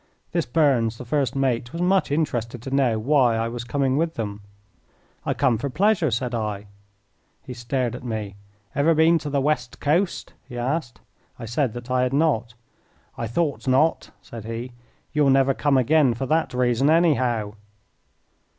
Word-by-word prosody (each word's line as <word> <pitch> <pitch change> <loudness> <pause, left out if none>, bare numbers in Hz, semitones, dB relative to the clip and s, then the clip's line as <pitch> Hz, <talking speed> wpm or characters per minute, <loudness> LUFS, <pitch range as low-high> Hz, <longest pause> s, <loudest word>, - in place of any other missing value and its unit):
This - - -1
Burns, 120 -5 +2
the 125 - -8
first 140 -1 0
mate, 125 -3 0
was 170 - -6
much 185 +2 +2
interested 125 -6 -1
to 135 - -5
know 130 -5 +2
why 125 0 +3
I 115 0 0
was 120 0 -5
coming 135 +2 0
with 165 +1 0
them. 105 -2 -4 0.9
"I - - 0
come 115 -3 +2
for 140 +3 -3
pleasure," 180 +2 +2
said 120 +1 -2
I. 105 -3 -3 0.8
He 125 - -8
stared 120 0 -2
at 125 - -9
me. 110 -5 -4 0.4
"Ever 160 +4 +3
been 160 +2 +4
to 150 -1 -5
the 140 -1 0
West 135 -4 -1
Coast?" 170 +6 0 0.2
he 125 - -7
asked. 125 +1 -3 0.4
I - - -7
said 120 +1 -1
that 120 +1 -8
I 130 0 +2
had 125 +1 0
not. 130 -7 +1 0.6
"I 115 - -4
thought 145 +4 -2
not," 135 +5 +2
said 115 -2 -9
he. 115 +2 -5 0.4
"You'll 150 -2 +3
never 135 0 +4
come 140 0 +1
again 130 -1 +3
for 135 - -3
that 160 +4 +1
reason, 125 +2 +2
anyhow." 130 -10 +2
130 Hz, 170 wpm, -23 LUFS, 120-150 Hz, 0.9 s, been